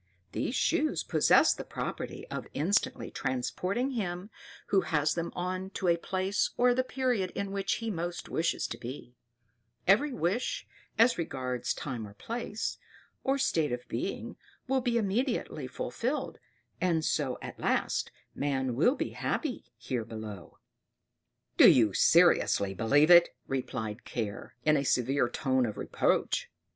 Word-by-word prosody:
These - - -2
shoes - - +1
possess - - +5
the - - -7
property - - -5
of - - -5
instantly 180 +9 0
transporting 185 - -1
him 195 -4 -3 0.4
who 195 - +4
has 150 -3 +1
them 170 0 -3
on 185 +1 -3
to 190 - -3
the 170 - +5
place 190 +3 0
or 245 0 +5
the 255 +1 +1
period 250 -7 0
in 200 -1 -3
which 195 0 0
he 225 -1 -3
most 175 -1 -4
wishes 165 +1 0
to 115 - -6
be; 125 0 -8 0.7
every 220 +10 +4
wish, 245 - -1 0.3
as 230 -2 +4
regards 125 -6 -2
time 120 -7 -5
or 100 - -14
place, 225 - -4 0.4
or 270 +1 +2
state 160 - +1
of 125 0 -4
being, - - -4 0.3
will 265 0 +2
be 240 -1 +1
immediately 215 - -1
fulfilled, 230 - -3 0.4
and 165 -3 +1
so 135 -5 0
at - - -8
last - - 0 0.2
man 130 -3 -1
will 200 - +3
be - - -3
happy, 295 -6 -2
here 120 0 -3
below." 110 -4 -8 1.0
"Do - - +10
you 110 -5 +5
seriously 165 - +4
believe 145 - +4
it?" 175 0 +8 0.2
replied 125 -4 -3
Care, 110 -3 -5
in 155 0 +5
a 140 - 0
severe 130 0 +2
tone 130 0 +1
of 105 - -5
reproach. - - 0
170 Hz, 145 wpm, -30 LUFS, 125-210 Hz, 1.0 s, Do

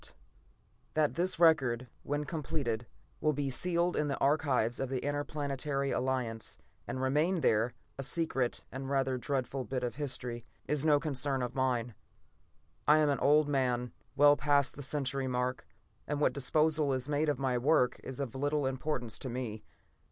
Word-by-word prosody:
] - - -38
That 155 -1 +2
this 180 0 0
record, 130 -7 +4
when 145 +1 -2
completed, 145 -7 -3 0.3
will 155 - +2
be 140 -1 -2
sealed 175 +4 +1
in 150 - +1
the 140 - -1
archives 135 -5 +1
of 135 - -2
the 130 0 -2
Interplanetary 145 -1 -1
Alliance 125 -4 -2 0.3
and 130 +2 -3
remain 150 +7 +1
there, 115 0 +2 0.2
a - - 0
secret 135 -3 0
and 135 +1 -5
rather 135 -2 +1
dreadful 135 0 -2
bit 130 0 -3
of 125 +2 -3
history, 125 -5 -3 0.2
is 150 -1 0
no 150 -2 +5
concern 140 -3 -1
of 125 +1 -3
mine. 125 -3 0 0.9
I 150 - +7
am 155 -1 +3
an 140 - +1
old 150 +1 +4
man, 125 -3 0 0.2
well 145 +1 +7
past 145 -2 +2
the 145 - -7
century 135 -1 -2
mark, 125 0 -2 0.4
and 145 -1 -1
what 140 -4 +3
disposal 150 +2 +2
is 130 0 -2
made 150 +1 +1
of 145 - +1
my 130 -2 0
work 130 -1 +3
is 130 0 -7
of 135 -5 -3
little 145 +1 0
importance 130 -3 -2
to 130 - -3
me. 120 -3 -4
135 Hz, 165 wpm, -32 LUFS, 125-150 Hz, 0.9 s, I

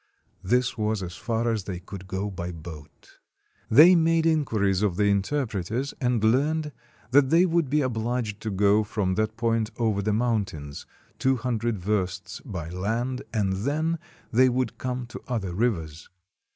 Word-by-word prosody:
This 125 +4 +1
was 105 -2 0
as 90 -1 -6
far 115 0 -1
as 110 -4 -2
they 90 -3 -4
could 95 +1 -10
go 95 +2 -3
by 90 -2 -5
boat. 80 -3 -12 0.5
They 155 +10 +8
made 165 -1 +3
inquiries 110 - +1
of 100 -4 +1
the 105 - +1
interpreters, 110 +3 -1
and 125 -3 +1
learned 150 +7 +2 0.4
that 135 0 +5
they 170 +4 +5
would 170 -5 +1
be 150 +2 +2
obliged 115 -3 -2
to 110 - -3
go 100 +2 +3
from 100 -3 -1
that 110 +3 -1
point 115 -1 +1
over 110 -4 +1
the 105 +2 0
mountains, 100 -11 -2 0.3
two 130 0 +3
hundred 120 -2 -1
versts 95 +1 -2
by 90 - -6
land, 115 +8 -2
and 100 -4 0
then 155 - -1 0.3
they 130 +3 +5
would 125 -1 -2
come 125 -1 -3
to 120 - -9
other 105 -8 -2
rivers. 85 -8 -2
110 Hz, 160 wpm, -26 LUFS, 95-125 Hz, 0.5 s, They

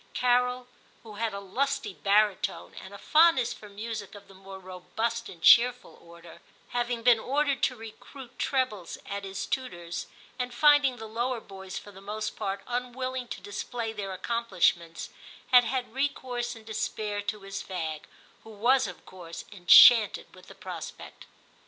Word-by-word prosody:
Carol, 250 0 +2 0.4
who 215 -3 -11
had 225 0 -1
a 200 - -5
lusty 270 +5 -2
baritone, 205 +1 +1
and 190 - -10
a 200 - -9
fondness 305 - +4
for 210 - -13
music 210 0 -6
of 200 0 -13
the 195 - -16
more 190 0 -11
robust 220 +6 -4
and 170 -2 -13
cheerful 245 +1 +5
order, 170 0 -15 0.3
having 240 -1 -2
been 240 -2 +6
ordered 280 +2 0
to 255 - +1
recruit 245 +3 -12
trebles 255 -10 -1
at 200 0 -5
his 195 0 -5
tutors, 175 -10 -4 0.3
and 250 -1 -3
finding 290 -2 +5
the 220 - -8
lower 235 +3 -2
boys 190 -3 -9
for 205 - -9
the 195 -1 -14
most 210 +2 -4
part 195 -2 -4
unwilling 250 +1 -4
to - - -7
display 225 +2 -5
their 200 -3 -5
accomplishments, 185 -5 -1 0.4
had 250 -1 +7
had 245 -1 -3
recourse 250 -3 -2
in 225 - -13
despair 215 -1 -3
to 205 0 -4
his 195 0 -6
fag, 160 -5 -5 0.4
who - - -13
was 235 +3 +2
of 180 - -10
course 170 -3 -10
en 180 -4 -14
chanted 225 +1 +8
with - - -16
the - - -13
prospect. - - -9
220 Hz, 160 wpm, -28 LUFS, 195-250 Hz, 0.4 s, chanted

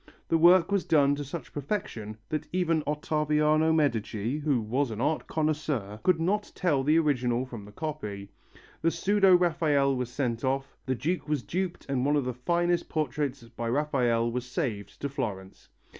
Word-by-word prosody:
The 165 - +4
work 175 +2 +6
was 200 -2 +2
done 145 -3 +4
to 145 0 -3
such 145 +4 -7
perfection 125 - -4
that 155 - -3
even 170 -3 +1
Ottaviano 150 +1 +2
Medici, 120 -4 0
who 145 -4 +1
was 125 +5 0
an 110 -1 -5
art 150 +5 0
connoisseur, 150 -10 -1
could 180 -3 +3
not 205 +5 0
tell 155 -7 +1
the 155 +4 +4
original 125 -6 +1
from 115 -5 -9
the 105 - -12
copy: 105 -8 -5 0.5
the 165 - +3
pseudo 195 +1 +4
Raphael 155 -6 +2
was 125 -1 -2
sent 125 -3 -2
off, 135 +1 -1
the 130 - +1
Duke 150 +4 -2
was 150 -5 0
duped 180 - -3
and 135 -2 0
one 145 +2 +2
of 145 -3 +1
the 125 - -2
finest 175 +7 0
portraits 145 -3 -2
by 115 0 -4
Raphael 120 -4 +1
was 125 +1 -3
saved 125 - -4
to 140 - -1
Florence. 105 -9 -5
145 Hz, 175 wpm, -28 LUFS, 125-160 Hz, 0.5 s, work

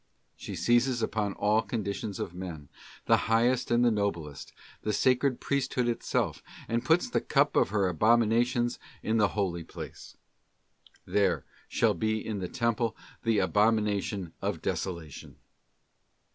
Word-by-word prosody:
She - - -7
seizes 120 0 +2
upon 105 -2 -1
all 105 +3 +2
conditions 105 -2 -4
of 85 - -4
men, 85 -6 -7 0.4
the - - +5
highest 120 +3 +2
and 120 +1 +3
the 120 - +5
noblest, 85 -9 -3 0.3
the 105 - -1
sacred 130 +1 +2
Priesthood 130 -3 0
itself, 120 - -1 0.3
and 115 +1 -1
puts 160 - +3
the 245 - 0
cup 145 0 +2
of - - +4
her 100 -2 +1
abominations 115 +5 +2 0.2
in 110 +1 +1
the 105 -2 +4
holy 90 -4 -1
place: - - -10 0.9
'There 100 -2 +1 0.2
shall - - +2
be 110 0 0
in 105 -2 -3
the 90 - -3
Temple 115 -1 0 0.2
the 115 -2 +1
abo 105 +3 +4
mination 100 -4 -1
of - - -2
desolation. 85 -6 -4
110 Hz, 140 wpm, -29 LUFS, 100-120 Hz, 0.9 s, the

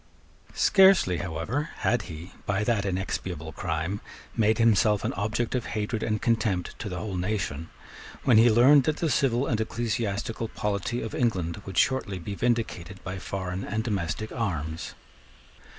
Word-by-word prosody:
Scarcely 190 - +5
however 85 - -3
had 120 - +1
he, 80 +2 -8 0.2
by 100 +1 +1
that 105 -2 +1
inexpiable 95 0 -3
crime, 80 +5 -3 0.3
made 110 -1 +3
himself 105 -2 +3
an - - -1
object 110 +3 -1
of 125 -2 -1
hatred 110 +1 -2
and 110 -1 0
contempt 110 -6 0
to 105 - -4
the 90 - -4
whole 100 +1 -4
nation, 90 -5 -2 0.5
when 120 -5 +6
he 120 +2 +7
learned 130 +5 +6
that 155 -1 +1
the 165 -3 0
civil 125 -1 +2
and 110 -5 0
ecclesiastical 115 0 -2
polity 105 +3 -2
of 110 - -5
England 95 -7 -1
would 95 - -6
shortly 130 -8 +2
be 90 +3 -5
vindicated 110 -6 -1
by 95 0 -5
foreign 95 0 -4
and 110 +1 -2
domestic 100 -2 -2
arms. 80 -8 -3
105 Hz, 150 wpm, -27 LUFS, 95-115 Hz, 0.5 s, he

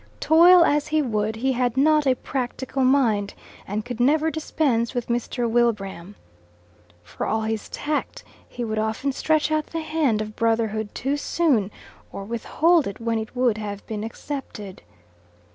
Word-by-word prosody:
Toil 340 +2 +7
as 295 -1 +1
he 310 0 +1
would, 215 -3 -1
he 260 +4 0
had 250 -1 0
not 300 +1 +4
a 260 - +4
practical 260 +1 -3
mind, 235 -7 +2 0.3
and 210 +2 -3
could 245 -1 -6
never 305 +5 +3
dispense 270 -7 -1
with 245 -1 -3
Mr. 240 0 -1
Wilbraham. 205 -5 -1 0.9
For - - -5
all 220 0 0
his 220 -1 -3
tact, 300 0 -3 0.3
he 245 - -5
would 215 -1 -2
often 220 +6 -1
stretch 310 +3 +1
out 310 -1 0
the 330 - -4
hand 310 -8 0
of 215 0 -5
brotherhood 220 -2 -1
too 275 +3 -1
soon, 285 - +1 0.4
or 195 - -6
withhold 300 - +1
it 200 - -7
when 230 -1 -1
it 220 +3 -7
would 245 -4 +1
have 205 -1 -6
been 215 -1 -5
accepted. 225 -5 -7
240 Hz, 160 wpm, -23 LUFS, 220-290 Hz, 0.9 s, Toil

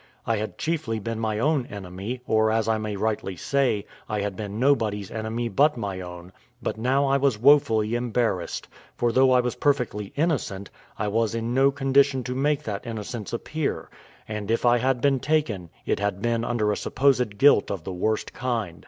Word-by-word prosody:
I 115 - +1
had 110 +1 -4
chiefly 155 -9 -2
been 110 +1 -4
my 110 -2 -1
own 140 +1 +1
enemy, 100 +5 -6
or, 110 -1 +3
as 110 0 +1
I 110 -1 +2
may 105 -1 -3
rightly 105 -2 -2
say, 125 0 0 0.2
I 105 -1 -1
had 100 -1 -3
been 105 +1 -5
nobody's 110 -7 +1
enemy 115 +2 -3
but 140 +7 +3
my 100 -4 -3
own; 90 0 -9 0.3
but - - -3
now 130 +5 +1
I 135 0 +3
was 135 -5 +2
woefully 115 -4 +4
embarrassed: 120 -6 -1 0.3
for 120 -1 +1
though 130 +2 +5
I 125 -1 +5
was 125 0 -2
perfectly 120 -8 0
innocent, 140 - -1 0.3
I 105 - -1
was 115 +2 0
in 115 +1 -2
no 135 +2 +5
condition 135 -1 +2
to 125 +1 -3
make 145 +3 0
that 105 -1 -5
innocence 110 -1 -5
appear; 155 +5 -3 0.4
and 105 -1 -5
if 115 +2 +1
I 120 0 +5
had 130 0 +1
been 140 -1 +3
taken, 125 - 0 0.2
it - - 0
had 100 -1 -1
been 115 +1 0
under 115 -3 0
a 105 - -1
supposed 125 -6 +1
guilt 140 -5 +5
of 95 -5 -4
the 95 - -5
worst 110 +5 -1
kind. 115 -10 -3
115 Hz, 190 wpm, -25 LUFS, 105-130 Hz, 0.4 s, though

